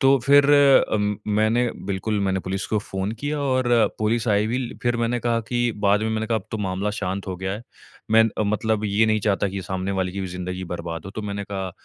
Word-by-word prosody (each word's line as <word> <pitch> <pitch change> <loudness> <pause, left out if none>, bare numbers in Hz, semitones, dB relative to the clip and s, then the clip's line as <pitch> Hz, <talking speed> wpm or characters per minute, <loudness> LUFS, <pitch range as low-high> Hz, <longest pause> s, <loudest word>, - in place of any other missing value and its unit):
तो 135 +1 +5
फिर 140 0 +7 0.5
अम, 105 -1 +1
मैंने 110 +3 +2 0.2
बिल्कुल 100 +2 -1
मैंने 95 -1 0
पुलिस 95 +2 -3
को 110 - 0
फ़ोन 95 -1 -4
किया 145 +1 -2
और 130 -2 +1 0.3
पुलिस 110 +2 0
आई 105 0 +3
भी 120 +3 -1
ल 125 -2 -5
फिर 120 -1 +1
मैंने 115 +1 0
कहा 115 -1 +1
कि 120 -1 +1
बाद 100 +1 +4
में 110 - 0
मैंने 110 0 -1
कहा 115 0 +1
अब 95 - -15
तो 110 - -2
मामला 95 +1 -1
शांत 100 -1 -4
हो 90 - -3
गया 95 +1 -3
है। 105 +4 -6 0.5
मैं 110 0 +6
अ, - - +2
मतलब 105 +1 0
ये 105 +2 +2
नहीं 110 -1 +2
चाहता 100 0 +1
कि 95 0 -4
सामने 95 +1 -3
वाले 90 -1 -1
की 100 - -4
भी 95 - -3
ज़िन्दगी 90 +1 -5
बर्बाद 85 -1 -5
हो 95 - -7
तो 110 - -5
मैंने 100 0 -4
कहा 95 -2 -3
105 Hz, 240 wpm, -23 LUFS, 95-115 Hz, 0.5 s, फिर